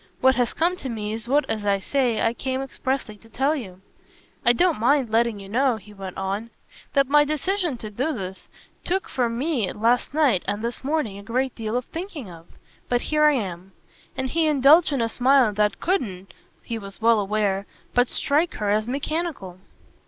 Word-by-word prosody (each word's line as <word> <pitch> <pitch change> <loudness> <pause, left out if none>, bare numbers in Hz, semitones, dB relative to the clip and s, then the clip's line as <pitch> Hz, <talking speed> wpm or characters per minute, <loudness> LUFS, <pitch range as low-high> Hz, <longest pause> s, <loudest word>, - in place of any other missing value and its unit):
"What 260 0 +5
has 245 -2 +1
come 345 +3 +2
to 270 - -5
me 215 -2 -3
is 225 +1 -6
what, 285 +4 +2
as 215 -2 -2
I 200 -1 +2
say, 245 +3 0
I 225 - +2
came 260 +1 -3
expressly 265 -4 -3
to 225 +2 -19
tell 270 +7 +1
you. 190 -9 -8 0.6
I 240 - +6
don't 340 +3 +2
mind 255 0 +2
letting 230 -1 +2
you 195 - -10
know," 250 +4 +2
he 210 -1 -12
went 195 -2 -8
on, 195 +4 -3 0.4
"that 275 -2 +3
my 295 +2 +5
decision 310 +1 -1
to 215 -2 -7
do 260 +9 -1
this 190 -7 -6 0.3
took 380 +2 -1
for 245 -2 0
me 240 - -1
last 240 +5 +1
night 275 - +3
and 205 +2 -2
this 235 +2 -4
morning 270 -9 -1
a - - -9
great 250 +5 -1
deal 225 +1 -3
of 250 - -3
thinking 325 - -7
of. 165 0 -13 0.4
But 245 0 +2
here 300 0 +5
I 300 - +6
am." 190 -6 -4 0.4
And 260 0 -1
he 325 -1 +2
indulged 300 +3 +5
in 275 -4 0
a - - +1
smile 250 -1 +3
that 210 -1 +1
couldn't, 200 - -2 0.3
he 230 -1 -4
was 200 -2 -10
well 225 0 +4
aware, 200 -1 0 0.3
but 245 0 +3
strike 305 +5 +1
her 205 -1 -1
as 215 +1 +1
mechanical. 275 - -3
240 Hz, 195 wpm, -24 LUFS, 210-280 Hz, 0.6 s, I